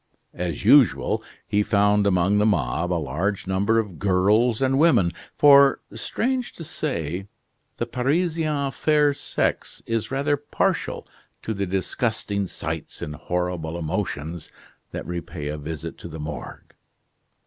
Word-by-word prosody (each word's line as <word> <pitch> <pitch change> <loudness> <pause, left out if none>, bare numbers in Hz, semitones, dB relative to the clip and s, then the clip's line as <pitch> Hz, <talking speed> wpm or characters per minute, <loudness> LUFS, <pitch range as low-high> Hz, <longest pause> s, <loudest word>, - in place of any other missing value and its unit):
As 85 -3 -4
usual, - - +5 0.2
he 105 - +1
found 105 0 +3
among 95 +2 +3
the 105 - +3
mob 85 - 0
a - - +2
large 85 +7 -2
number 100 +4 +1
of 105 -7 -2
girls 105 +5 +3
and 135 0 +2
women; 120 - +4 0.3
for, 140 -1 +7
strange 255 +1 -2
to 165 - -9
say, 95 - -3 0.5
the 120 - -1
Parisian 150 +3 0
fair 150 0 +3
sex - - -2
is 115 -1 -2
rather 145 +2 +1
partial 145 - -1 0.4
to 110 - -2
the 100 -2 -2
disgusting 100 +1 -1
sights - - -5
and 75 - -5
horrible 90 0 -3
emotions 80 0 -3 0.4
that - - -6
repay 85 -3 -5
a 75 - -3
visit 75 0 -6
to - - -8
the 80 -1 -8
Morgue. 75 -3 -7
100 Hz, 135 wpm, -24 LUFS, 85-135 Hz, 0.5 s, for